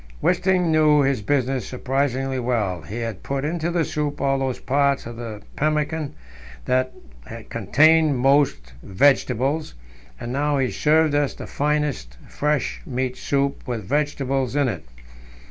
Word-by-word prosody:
Wisting 180 - +2
knew 155 -2 +5
his 135 -4 +1
business 135 +1 0
surprisingly 135 0 -1
well; 110 -8 -1
he 105 +8 -7
had 115 -5 -4
put 140 0 -3
into 165 +1 -1
the 170 -2 +1
soup 150 -1 -3
all 135 -1 +1
those 130 -2 -1
parts 140 0 +1
of 120 0 -7
the 115 -3 -7
pemmican 150 - -1 0.5
that 130 0 +1 0.6
contained 155 -1 +4
most 130 - +2
vegetables, 135 - +1 0.4
and 120 +1 -5
now 145 +1 +1
he 130 -2 0
served 155 0 +3
us 145 -1 +1
the - - -8
finest 145 - -2
fresh 150 -1 -1
meat 130 -1 -3
soup 140 0 -1
with 120 -4 -3
vegetables 135 0 -1
in 145 -2 +2
it. 90 -8 -5
140 Hz, 140 wpm, -23 LUFS, 125-150 Hz, 0.6 s, knew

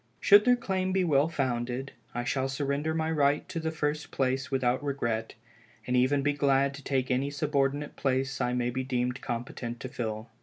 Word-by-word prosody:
Should 205 0 +7
their 250 0 +6
claim 190 -5 -1
be 190 -1 +2
well 150 -2 +3
founded, 130 -3 -2 0.2
I 120 - -1
shall 135 +2 -1
surrender 140 +3 -1
my 160 0 0
right 145 0 +2
to 180 -3 -3
the 160 0 -1
first 150 -1 -2
place 135 0 -1
without 130 -1 +1
regret, 115 -6 -2 0.5
and 125 - -2
be 125 - +4
even 135 +2 +2
glad 140 -1 +2
to 140 0 -10
take 130 -1 0
any 130 +3 +1
subordinate 145 0 -1
place 135 0 0
I 125 0 +1
may 125 0 0
be 130 +1 -2
deemed 125 0 -1
competent 120 0 -4
to 130 - -5
fill. 110 -2 -4
135 Hz, 190 wpm, -29 LUFS, 125-145 Hz, 0.5 s, Should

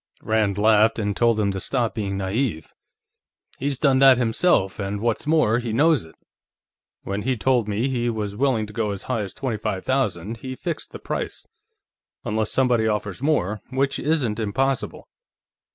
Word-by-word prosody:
Rand 110 -3 +1
laughed 110 +1 +4
and 105 -3 -1
told 115 -1 +2
him 100 -2 +1
to 95 - -4
stop 120 +1 -1
being 100 -3 -3
naïve. 95 - -2 0.9
"He's 140 0 -1
done 135 -1 +3
that, 135 -2 +7
himself, 115 - +2
and 100 0 -3
what's 115 +5 -1
more, 150 -8 +3
he 120 -2 -4
knows 145 - +3
it. 80 - -17 0.9
When 100 +1 -3
he 130 +2 -1
told 120 -1 +2
me 105 +5 0
he 120 -3 -1
was 105 -3 -3
willing 125 -3 +1
to 105 - -12
go 110 -1 -1
as 100 -2 -4
high 125 -4 -1
as 100 - -6
twenty 130 -5 -2
five 100 -3 -3
thousand, 115 -6 -1
he 130 +3 -6
fixed - - -4
the - - -7
price. - - -4 0.8
Unless 110 0 -1
somebody 125 -4 +2
offers 105 -1 -2
more, 110 - 0
which 135 +1 0
isn't 135 -8 0
impossible." 130 +5 -1
110 Hz, 170 wpm, -23 LUFS, 105-130 Hz, 0.9 s, that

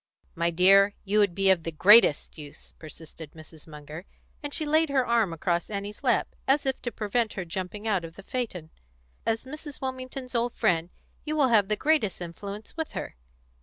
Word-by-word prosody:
"My 170 +1 0
dear, 195 +4 +5
you 205 +2 +2
would 200 -4 +2
be 195 -1 +4
of 185 -3 +2
the 165 - -5
greatest 195 0 +5
use," 145 -2 -11
persisted 160 0 -11 0.3
Munger, 150 +3 -10 0.4
and 290 -1 -6
she 310 - -2
laid 310 +1 +2
her 265 -2 +1
arm 230 -6 +2
across 170 +1 -2
Annie's 205 0 -6
lap, - - +1
as 280 +2 +2
if 265 -1 -2
to 240 - -4
prevent 220 +1 -1
her 190 - -5
jumping 190 +4 -6
out 200 -5 +1
of 165 0 -9
the 195 - -12
phaeton. 190 -10 -5 0.6
"As 225 +2 -1
Mrs. 295 +1 -9
Wilmington's 260 0 -6
old 235 0 -1
friend, 170 -1 +1 0.3
you 305 0 -3
will 285 -4 +3
have 210 -4 +4
the 210 - 0
greatest 295 - +1
influence 200 +5 -8
with 320 -1 -4
her." - - -6
205 Hz, 185 wpm, -27 LUFS, 170-255 Hz, 0.6 s, dear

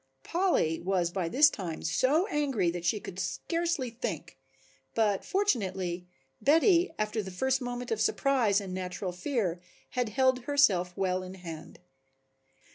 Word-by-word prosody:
Polly 340 - +1
was 180 -1 0
by 175 -3 -2
this 295 - +6
time 175 -6 -5
so 260 - +2
angry 275 - 0
that 175 0 -6
she 210 +5 +1
could 190 -2 -8
scarcely 320 - -2
think, 175 - -5 0.6
but, 210 -3 +2
fortunately, 190 - -1 0.3
Betty, 335 +5 +4
after 215 +1 -1
the 190 - -7
first 265 +9 0
moment 245 -1 -4
of 220 -1 0
surprise 235 -5 +2
and 195 -3 -6
natural 185 0 -4
fear, 180 - -2 0.3
had 250 -4 -1
held 255 +2 +2
herself 210 -12 +3
well 185 -1 0
in 185 +1 -8
hand. 165 -2 -9
210 Hz, 140 wpm, -29 LUFS, 180-265 Hz, 0.6 s, this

